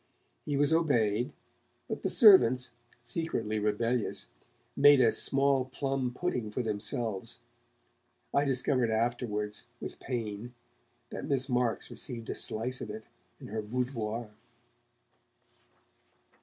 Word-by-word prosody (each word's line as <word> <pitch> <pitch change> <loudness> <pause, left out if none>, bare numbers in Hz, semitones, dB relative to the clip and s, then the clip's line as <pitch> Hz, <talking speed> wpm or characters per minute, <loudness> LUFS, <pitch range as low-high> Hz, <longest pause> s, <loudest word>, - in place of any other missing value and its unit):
He 145 -2 -1
was 145 +2 +3
obeyed, 125 -6 +2 0.6
but - - -4
the - - -1
servants, 125 - +6 0.3
secretly 115 -5 -2
rebellious, 110 +3 -1 0.5
made 145 0 +7
a 120 -3 +5
small 135 -1 +3
plum 135 -1 -2
pudding 125 -6 -2
for 125 +4 -3
themselves. 110 +1 -2 1.0
(I 140 - +3
discovered 130 -2 +1
afterwards, 110 -2 -2
with - - -7
pain, 115 -1 -5 0.6
that - - -5
Miss 135 -1 0
Marks 125 -2 0
received 115 -4 -5
a - - -4
slice 125 +4 -1
of - - -6
it 110 +1 -7 0.4
in - - -10
her 110 +1 -3
boudoir.) 115 -1 -3
120 Hz, 115 wpm, -30 LUFS, 110-135 Hz, 1.0 s, made